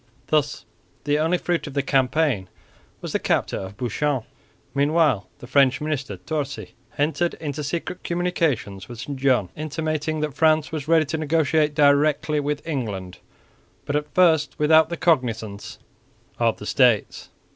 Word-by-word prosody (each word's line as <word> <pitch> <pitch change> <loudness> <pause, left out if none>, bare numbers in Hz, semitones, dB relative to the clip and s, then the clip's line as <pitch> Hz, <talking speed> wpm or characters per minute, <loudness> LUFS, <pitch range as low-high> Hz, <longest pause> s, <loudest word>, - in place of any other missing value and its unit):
Thus 150 -1 0 0.4
the 145 0 +1
only 165 +3 +2
fruit 175 -2 -2
of 145 - -8
the 140 - +1
campaign 135 - +1 0.5
was - - -5
the - - +1
capture - - 0
of 95 +1 -8
Bouchain. 130 +2 -1 0.5
Meanwhile 145 -6 +2
the - - -11
French 130 0 +3
minister 145 -9 -3
Torcy 135 - -4 0.2
entered 160 +4 0
into 150 -1 -5
secret 170 +4 -4
communications 160 - -1
with 120 -2 -9
St 135 +3 -6
John, 130 -9 +2
intimating 155 0 -2
that 150 -2 -2
France 155 +1 +2
was 155 -3 -4
ready 165 -1 +4
to 160 +3 -3
negotiate 155 -1 +1
directly 150 +1 +3
with 145 +2 -3
England, 100 - -4 0.7
but 140 - -2
at 150 0 -2
first 165 -4 +3
without 155 +1 +5
the 170 - -4
cognisance 115 - -1 0.6
of 115 -1 +2
the 105 - -9
States. 120 -4 +2
145 Hz, 145 wpm, -23 LUFS, 125-155 Hz, 0.7 s, without